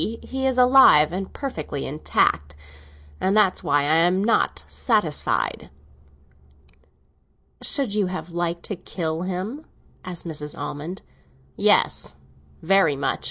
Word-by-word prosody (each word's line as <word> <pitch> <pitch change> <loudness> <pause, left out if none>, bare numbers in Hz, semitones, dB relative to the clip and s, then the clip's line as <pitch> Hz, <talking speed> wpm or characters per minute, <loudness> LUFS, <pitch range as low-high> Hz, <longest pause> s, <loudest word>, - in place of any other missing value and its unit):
He 265 +4 -3
is 260 -1 0
alive 250 - +6
and 190 +1 -4
perfectly 160 - -5
intact, 75 - 0 0.6
and 195 +3 +1
that's 200 -3 +2
why 145 0 +2
I 150 +3 +2
am 180 +3 +3
not 230 +2 +1
satisfied." 210 - -1 1.9
"Should 265 -8 0
you 210 -3 +1
have 180 -1 -6
liked 170 0 -3
to 205 - -4
kill 165 -2 -4
him?" 190 - -4 0.4
asked 180 -2 -6
Mrs. 150 -3 -4
Almond. 165 +7 -6 0.5
"Yes, - - +2 0.5
very 185 -4 +3
much. 135 0 -2
180 Hz, 115 wpm, -23 LUFS, 155-210 Hz, 1.9 s, alive